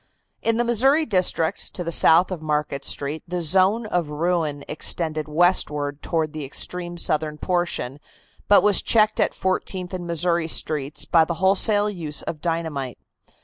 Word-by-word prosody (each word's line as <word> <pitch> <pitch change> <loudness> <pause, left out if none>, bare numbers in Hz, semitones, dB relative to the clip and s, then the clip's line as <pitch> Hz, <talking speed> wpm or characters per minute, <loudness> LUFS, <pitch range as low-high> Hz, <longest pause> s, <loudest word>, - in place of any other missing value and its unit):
In 230 0 0
the 240 - +1
Missouri 265 +7 +3
district, 185 - 0
to 180 - -4
the 170 - -4
south 170 +3 +4
of 175 -4 -5
Market 150 -2 -2
Street, 145 +3 0
the 180 +1 -3
zone 190 +7 +3
of 175 -7 -2
ruin 155 -2 -2
extended 155 0 -3
westward 150 -3 +1
toward 160 -2 -2
the 155 -1 -6
extreme 175 +5 -5
southern 155 -2 0
portion, 175 -7 -3 0.5
but 205 - +5
was 205 -2 +4
checked 215 -1 +2
at - - +1
Fourteenth 185 0 -3
and 175 -2 -5
Missouri 170 0 +1
Streets 150 -2 -1
by 165 -2 +4
the 170 +1 -3
wholesale 200 +4 +3
use 165 -8 -3
of 150 - -6
dynamite. 160 -7 -3
170 Hz, 155 wpm, -22 LUFS, 150-185 Hz, 0.5 s, but